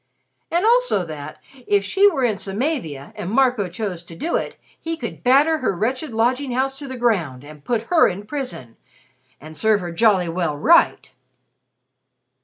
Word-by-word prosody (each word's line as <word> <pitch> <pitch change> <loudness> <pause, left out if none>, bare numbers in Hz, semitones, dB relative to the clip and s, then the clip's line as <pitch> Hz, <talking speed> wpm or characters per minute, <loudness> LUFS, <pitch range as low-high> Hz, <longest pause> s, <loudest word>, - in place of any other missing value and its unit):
And 345 +4 +1
also 475 - +3
that 155 -2 -8 0.3
if 200 -1 +2
she 395 - +4
were 275 -9 -2
in 220 -4 +1
Samavia, 195 - -3
and 180 - -5
Marco 245 -4 +2
chose 180 -1 -5
to 170 - -10
do 330 - -2
it - - -3 0.2
he 330 0 -4
could - - -7
batter 290 +5 +4
her 225 -7 -1
wretched 255 - -2
lodging 250 +4 0
house 265 +2 0
to 285 - -7
the 260 -1 -6
ground 175 - 0
and 150 0 -13
put 230 +2 -1
her 320 +7 +4
in 195 +2 -4
a - - -19
prison 250 - -6 0.6
"and 155 +2 -12
serve 215 +6 +2
her 175 -1 -5
jolly 190 -1 +3
well 165 -3 -2
right!" - - +3
220 Hz, 175 wpm, -21 LUFS, 175-270 Hz, 0.6 s, she